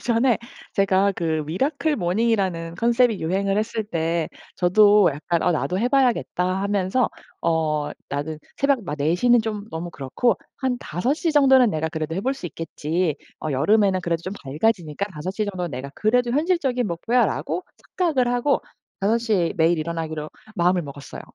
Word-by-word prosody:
예전에 240 +1 +2 0.3
제가 195 0 +3
그 160 -2 -1
미라클 280 - 0
모닝이라는 185 -3 0
컨셉이 235 -1 +2
유행을 195 +4 0
했을 220 +1 -2
때 165 -4 -1 0.3
저도 205 +1 +5
약간 160 +4 -1
'어 180 - +3
나도 180 +3 -1
해 240 - +1
봐야겠다.' 250 -8 +2 0.2
하면서 200 +4 +1 0.3
'어 155 -3 0 0.2
나는 145 +2 -3 0.2
새벽 275 -3 +2
막 150 -4 -4
4 150 +3 +1
시는 240 +5 +4
좀 215 -2 -4
너무 170 +2 -5
그렇고 170 - 0 0.2
한 255 -2 -1
5 180 - -1
시 325 +2 0
정도는 265 -4 +6
내가 160 -4 -1
그래도 160 0 -3
해 190 - -1
볼 265 - +1
수 265 - -7
있겠지. 165 0 -2 0.2
어 155 - -3
여름에는 195 +7 +3
그래도 170 -1 -2
좀 185 - -5
밝아지니까 160 +4 -1
5 165 +4 -5
시 215 +2 -1
정도는 185 -4 -4
내가 135 +1 -6
그래도 240 +3 +2
현실적인 275 -4 +1
목표야.'라고 230 - 0 0.4
착각을 310 -9 +2
하고 245 +4 +2 0.4
5 210 +4 +2
시에 210 -8 +1
매일 165 +1 +3
일어나기로 155 -1 -4 0.3
마음을 180 0 +3
먹었어요. 140 -3 -9
190 Hz, 340 characters per minute, -23 LUFS, 165-235 Hz, 0.4 s, 정도는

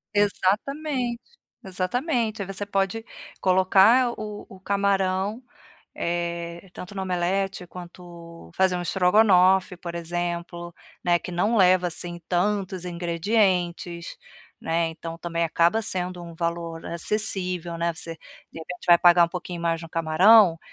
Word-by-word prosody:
Exatamente, 240 +6 0 0.5
exatamente. 220 - -2
Aí - - -3
você 195 +1 -3
pode 195 +2 -1 0.4
colocar 195 +7 +4
o 210 -1 -7
o 190 - -14
camarão, 200 +2 0 0.5
eh, 170 +1 -4
tanto 185 +3 -9
no 195 - -3
omelete 185 +1 -1
quanto 170 - -12
fazer 190 -1 +2
um 180 - -3
strogonoff, 185 0 +3
por 170 -1 -7
exemplo, 175 0 -4 0.3
né, 175 -1 +3
que 180 - -8
não 205 +7 0
leva, 180 -1 +4
assim, 175 +1 -4
tantos 185 0 -1
ingredientes, 175 - -1 0.4
né. 165 +1 0
Então, 165 0 -8
também 170 0 -2
acaba 170 +7 +2
sendo 180 -3 -2
um 170 -1 -10
valor 170 0 -4
acessível, 180 -1 -2
né. 170 0 -1
Você, 165 0 -6 0.4
de - - -10
repente 180 +2 -9
vai 175 -1 +8
pagar 175 0 +6
um - - -3
pouquinho 175 -1 -6
mais 165 0 -1
no 165 - -10
camarão, 170 +3 +5
180 Hz, 130 wpm, -24 LUFS, 170-195 Hz, 0.5 s, vai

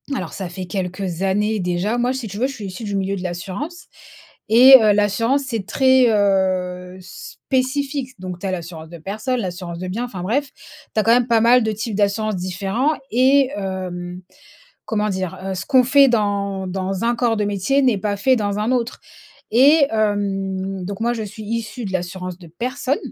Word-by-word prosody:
alors - - -4
ça 190 - -5
fait 180 +2 -7
quelques 185 -2 -4
années 210 +3 +1
déjà. 180 +5 -1
Moi 245 +1 +1
si 255 -5 -5
tu 200 - -7
veux 255 - +1
je 275 - -7
suis 220 -6 -8
issue 190 +4 -7
du 205 - -3
milieu 195 0 -1
de 185 - -6
l'assurance 190 - -6 0.6
et 250 +5 +9
heu, 215 -1 +5
l'assurance 220 +7 +1
c'est 230 -7 -4
très, 260 +3 +4
heu, 185 -3 0
spécifique. 265 +7 -3
Donc 180 -1 -6
tu 195 - -7
as - - -1
l'assurance 165 -3 -6
de 170 - -9
personne, 215 +9 -3
l'assurance 175 -2 -5
de 185 0 -5
bien, 230 +7 -2
enfin 190 -7 -7
bref. 265 +8 0
Tu 220 - -8
as - - +2
quand 225 - +3
même 245 0 +3
pas 230 -2 +3
mal 240 +2 +5
de 220 0 -1
types 220 0 -4
d'assurance 205 0 0
différents 195 - -1 0.2
et 260 +2 +4
hem, 180 -2 -5 0.6
comment 210 -1 -1
dire, 190 -3 -3
heu, 190 0 -3
ce 185 - -5
qu'on 260 -2 +5
fait 275 +2 +5
dans 200 -4 -1
dans 190 +2 -3
un 235 +1 +2
corps 235 -2 +1
de 210 - 0
métier 205 +8 +1
n'est 250 -6 +3
pas 205 0 -2
fait 255 +6 +3
dans 205 -2 -1
un 215 +4 0
autre 245 -2 -1 0.6
et 285 +3 +6
hem, 195 -3 -1
donc 200 +3 -6
moi 235 +1 +1
je 230 - -3
suis 215 +1 -8
issue 230 +2 -4
de 195 - -5
l'assurance 180 0 -4
de 175 -3 -13
personne. 255 - -2
205 Hz, 195 wpm, -20 LUFS, 185-240 Hz, 0.6 s, et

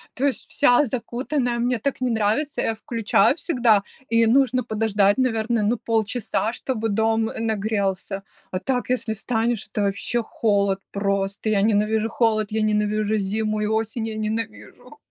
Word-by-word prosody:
то 265 - 0
есть 275 -5 -1
вся 280 +1 +4
закутанная, 245 +1 -2
мне 245 -1 0
так 275 +2 -2
не 255 - +1
нравится. 225 +7 0
Я 225 - 0
включаю 225 +2 +2
всегда, 240 - +2 0.3
и 230 0 +4
нужно 255 +1 +3
подождать, 210 -2 +2
наверное, 230 -3 +1
ну 225 +4 +1
полчаса, 220 -1 -1
чтобы 225 -3 -2
дом, 225 +1 +1
э, - - -6
нагрелся. 200 -3 -1 0.3
А 185 - -2
так 250 +1 -2
если 250 -3 0
встанешь, 225 +1 -1
это 205 0 -3
вообще 225 +3 -1
холод 200 -3 +1
просто. 200 +1 -1
Я 200 -2 +2
ненавижу 215 +1 +2
холод, 215 -2 +1
я 220 0 0
ненавижу 215 0 +1
зиму 215 +2 -1
и - - 0
осень, 220 +1 -1
я 220 - -5
ненавижу! 220 +5 -5
220 Hz, 155 wpm, -23 LUFS, 210-240 Hz, 0.3 s, вся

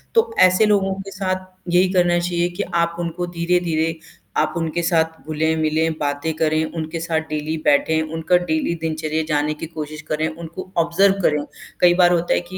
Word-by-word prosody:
तो 455 0 +4 0.2
ऐसे 185 +4 +3
लोगों 200 -2 +2
के 195 0 -9
साथ 185 -1 -2 0.3
यही 180 +1 +4
करना 175 -1 +3
चाहिए 175 0 0
कि - - +2 0.2
आप 170 0 -3
उनको 175 +1 -3
धीरे-धीरे 170 -2 +1 0.4
आप 155 0 +1
उनके 165 0 -1
साथ 165 -2 +2 0.2
घुले-मिले, 160 0 +1
बातें 145 +2 -1
करें, 155 0 +1
उनके 160 +1 -3
साथ 160 -1 0
डेली 155 +1 -2
बैठे, 155 +2 +3
उनका 165 +2 +2
डेली 170 -1 -1
दिनचर्या 160 -1 -1
जाने 150 -1 +1
की 155 - -7
कोशिश 155 -1 -7
करें, 155 +1 0
उनको 165 +3 -8
ऑब्ज़र्व 170 +4 +4
करें। 150 -4 +2 0.4
कई 175 -1 +6
बार 175 0 +6
होता 175 0 +2
है - - +2
कि 185 - -6
165 Hz, 175 wpm, -21 LUFS, 155-175 Hz, 0.4 s, कई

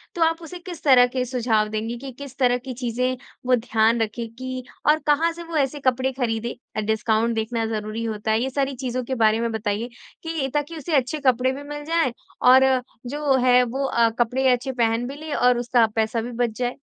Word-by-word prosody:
तो 340 - -4
आप 325 +1 +1
उसे 355 +2 -8
किस 345 -3 -9
तरह 250 -4 +6
के 250 0 -2
सुझाव 230 -4 +1
देंगी 225 +2 -3
कि 270 +1 -8
किस 280 -2 -9
तरह 250 -2 +3
की 255 +1 -7
चीज़ें 250 +1 -1 0.3
वो 250 0 +4
ध्यान 225 0 +2
रखे 225 +2 -2
कि, 255 +2 -6 0.2
और 305 +1 +5
कहाँ 315 +3 +3
से 340 - -8
वो 330 -1 -4
ऐसे 285 0 0
कपड़े 260 0 +1
ख़रीदे? 235 -3 -2 0.3
डिस्काउंट 220 +1 +1
देखना 225 +1 -1
ज़रूरी 220 +1 -3
होता 220 -1 -2
है, 220 - +2
ये 265 - -1
सारी 275 0 -1
चीज़ों 255 -1 -3
के 260 +2 -3
बारे 220 -1 +3
में 235 0 -1
बताइए, 220 +1 -2 0.3
कि 325 -4 -2
ताकि 295 +3 -2
उसे 310 +1 -2
अच्छे 270 +3 +1
कपड़े 255 0 +3
भी 280 +2 -7
मिल 295 0 -7
जाए 330 -5 +1 0.4
और 260 +1 +8 0.4
जो 295 +4 -5
वो 270 -2 +4
है 250 0 +6
वो 265 +3 -2
अ, 235 -3 +3
कपड़े 255 +3 +2
अच्छे 250 +2 0
पहन 235 -1 0
भी 275 - -6
ले 305 0 -6
और 250 -2 +3
उसका 240 -1 +3
पैसा 220 +1 0
भी 240 +2 -6
बच 235 -2 -1
जाए। 245 0 -1
250 Hz, 215 wpm, -23 LUFS, 230-275 Hz, 0.4 s, और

